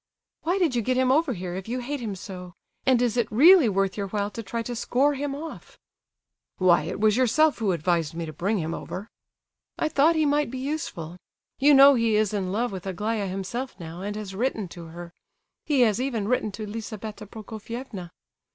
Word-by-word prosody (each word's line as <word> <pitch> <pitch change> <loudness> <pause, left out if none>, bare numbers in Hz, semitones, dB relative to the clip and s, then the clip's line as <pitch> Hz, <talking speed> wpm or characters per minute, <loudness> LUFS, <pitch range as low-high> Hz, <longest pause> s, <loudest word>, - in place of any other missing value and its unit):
"Why 350 +4 0
did 345 -8 +2
you 240 - +2
get 255 +3 0
him 260 0 +3
over 295 -1 +2
here, 180 -3 -5
if 190 +2 -6
you 245 +3 -2
hate 275 +3 -4
him 220 -5 -4
so? 180 -1 -9 0.3
And 260 -2 +5
is 240 -1 0
it 240 - 0
really 305 - +7
worth 195 0 0
your 200 -1 -2
while 205 +1 -2
to 230 - -6
try 230 +2 -4
to 240 +1 -5
score 270 +5 +2
off 275 - -6
him?" 285 -1 -2 1.2
"Why, 175 -4 +4
it 180 - -4
was 215 +1 +3
yourself 285 +5 +3
who 210 -4 +1
advised 165 -2 0
me 170 0 -3
to 155 - -7
bring 195 +8 0
him 165 -2 -2
over!" 200 +4 -6 0.7
"I 315 - 0
thought 310 +2 +4
he 315 -1 +2
might 295 -1 +2
be 260 - -6
useful. 255 - -4 0.4
You 285 +1 +6
know 275 +1 +9
he 230 -3 +2
is 215 0 +2
in 190 -3 -1
love 235 +4 0
with 190 -1 -6
Aglaya 205 +2 -2
himself, 195 +6 -5
now, 165 +1 -8
and 205 +1 -4
has 210 -2 -6
written 220 -1 -1
to 170 0 -10
her; 170 +1 -10 0.5
he 285 -4 +3
has 225 -1 +3
even 235 -6 -2
written 225 -3 0
to 215 +1 -5
Lizabetha 215 0 -7
Prokofievna!" 220 -2 -8
215 Hz, 205 wpm, -25 LUFS, 190-260 Hz, 1.2 s, know